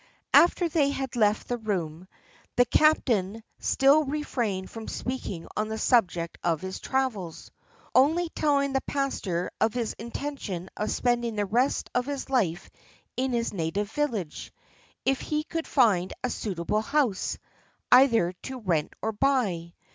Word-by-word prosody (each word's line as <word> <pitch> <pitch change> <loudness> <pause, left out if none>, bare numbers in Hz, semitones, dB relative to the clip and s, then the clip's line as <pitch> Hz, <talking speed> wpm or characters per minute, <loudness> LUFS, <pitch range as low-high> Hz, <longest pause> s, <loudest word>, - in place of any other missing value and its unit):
After 345 +1 +6
they 300 -3 +2
had 270 -3 -3
left 215 -2 +2
the 245 -1 -2
room, 180 -5 -3 0.5
the 245 - +5
captain 225 -9 +2 0.2
still 280 +3 +4
refrained 245 -10 -2
from 225 -1 -8
speaking 245 -9 -4
on 215 - 0
the 220 0 -4
subject 180 -8 +1
of 165 -3 +1
his 190 +2 -6
travels, 225 -11 -2 0.4
only 320 +7 +4
telling 280 -3 +1
the 270 - +1
pastor 200 -11 -2
of 220 +1 +2
his 235 -3 -1
intention 230 -7 -5
of 210 - -2
spending 240 -2 0
the 205 -1 0
rest 240 +7 0
of 245 +1 0
his 280 -1 -4
life 195 -9 0 0.4
in 260 +1 0
his 235 -2 -1
native 195 +4 -2
village, 225 - -3 0.5
if 270 0 +1
he 305 0 -1
could 330 +1 -4
find 195 -9 +3
a 250 - 0
suitable 195 +1 -2
house, 240 -5 0 0.5
either 235 -8 +6
to 265 -1 -6
rent 170 -9 -1
or 220 - 0
buy. 205 -9 0
235 Hz, 145 wpm, -27 LUFS, 190-270 Hz, 0.5 s, After